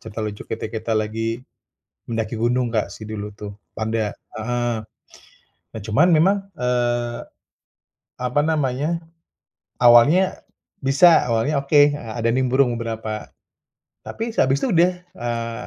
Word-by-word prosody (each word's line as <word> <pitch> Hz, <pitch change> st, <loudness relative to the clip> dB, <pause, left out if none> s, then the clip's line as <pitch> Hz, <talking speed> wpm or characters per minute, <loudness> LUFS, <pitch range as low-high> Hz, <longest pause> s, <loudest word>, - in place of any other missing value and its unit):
cerita 110 Hz, 0 st, -7 dB
lucu, 105 Hz, -1 st, -4 dB
kita-kita 110 Hz, 0 st, -4 dB
lagi 115 Hz, +2 st, -1 dB, 0.7 s
mendaki 115 Hz, 0 st, -2 dB
gunung, 120 Hz, +2 st, +1 dB
Kak, 110 Hz, -3 st, -1 dB
sih 110 Hz, 0 st, -9 dB
dulu 105 Hz, -1 st, -5 dB
tuh. 105 Hz, 0 st, -8 dB, 0.2 s
Panda 110 Hz, -1 st, -2 dB
heeh, 120 Hz, +2 st, -3 dB, 1.0 s
nah, 110 Hz, -, -5 dB
cuman 140 Hz, +12 st, +3 dB
memang, 180 Hz, +5 st, +4 dB, 0.2 s
eee, 120 Hz, -1 st, -1 dB, 1.0 s
apa 125 Hz, +3 st, 0 dB
namanya, 155 Hz, +2 st, -1 dB, 0.8 s
awalnya 125 Hz, +10 st, +5 dB, 0.4 s
bisa, 160 Hz, +6 st, +6 dB
awalnya 115 Hz, +6 st, +1 dB
oke, 145 Hz, 0 st, +5 dB
a 115 Hz, -3 st, -6 dB
ada 115 Hz, -, +1 dB
nimbrung 130 Hz, 0 st, +2 dB
beberapa, 110 Hz, -2 st, -5 dB, 0.7 s
tapi 225 Hz, +1 st, -5 dB
sehabis 135 Hz, -, +2 dB
itu 245 Hz, -, 0 dB
udah, 175 Hz, +2 st, +4 dB, 0.2 s
eee, 115 Hz, -1 st, -4 dB
120 Hz, 120 wpm, -22 LUFS, 110-140 Hz, 1.0 s, bisa